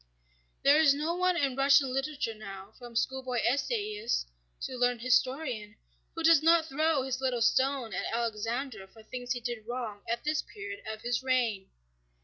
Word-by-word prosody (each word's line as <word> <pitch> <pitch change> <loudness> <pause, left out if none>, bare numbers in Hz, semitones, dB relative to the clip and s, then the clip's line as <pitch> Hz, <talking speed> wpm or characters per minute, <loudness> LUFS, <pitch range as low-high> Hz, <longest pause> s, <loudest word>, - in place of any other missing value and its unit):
There 285 +2 +6
is 295 -3 +6
no 310 +4 -1
one 365 0 +1
in 275 -5 +1
Russian 275 -1 +4
literature 270 -3 -2
now, 200 -1 -10
from 240 -1 -11
schoolboy 260 0 -1
essayist 410 - 0 0.3
to 260 - -4
learned 245 -1 +1
historian, 255 -3 0 0.4
who 330 - -3
does 325 -2 +6
not 330 0 +5
throw 310 -1 +1
his 260 0 -3
little 250 -3 +1
stone 260 -2 +2
at - - -2
Alexander 230 -1 -2
for 220 +3 -17
things 245 +2 -4
he 245 - -4
did 235 -2 -5
wrong 235 -4 -4
at 235 +1 -1
this 305 +1 0
period 405 -1 -8
of 215 0 -8
his 240 +1 0
reign. 240 -7 0
255 Hz, 165 wpm, -30 LUFS, 235-290 Hz, 0.4 s, There